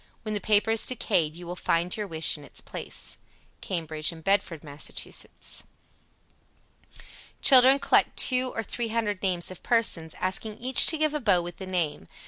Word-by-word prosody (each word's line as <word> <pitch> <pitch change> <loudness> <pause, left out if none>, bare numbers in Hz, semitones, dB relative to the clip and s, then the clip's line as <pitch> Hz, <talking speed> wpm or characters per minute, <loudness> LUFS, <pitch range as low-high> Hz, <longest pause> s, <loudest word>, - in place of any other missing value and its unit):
When 215 -1 -5
the 205 - -3
paper 210 +1 +2
is 225 - +3
decayed 175 -10 -1
you 175 +1 -11
will 175 +1 -7
find 175 0 -1
your 210 -2 -5
wish 160 -2 +2
in 150 - -12
its - - -7
place. - - -5 0.4
Cambridge 160 -4 -1
and 160 -1 -13
Bedford, 190 -5 -1
Mass. 145 -1 -7
77. - - -3 1.8
Children 265 0 +8
collect - - +1
two 255 0 +3
or 225 - -3
three 235 +2 -4
hundred 220 -3 -3
names 180 -2 -1
of 185 - -11
persons, 185 -9 0
asking 210 +3 -2
each 255 +1 +5
to 320 - +5
give 310 -1 0
a 300 - -2
bow 200 -9 +1
with 175 0 -9
the 190 - -9
name. 175 -5 -3
195 Hz, 175 wpm, -25 LUFS, 170-230 Hz, 1.8 s, Children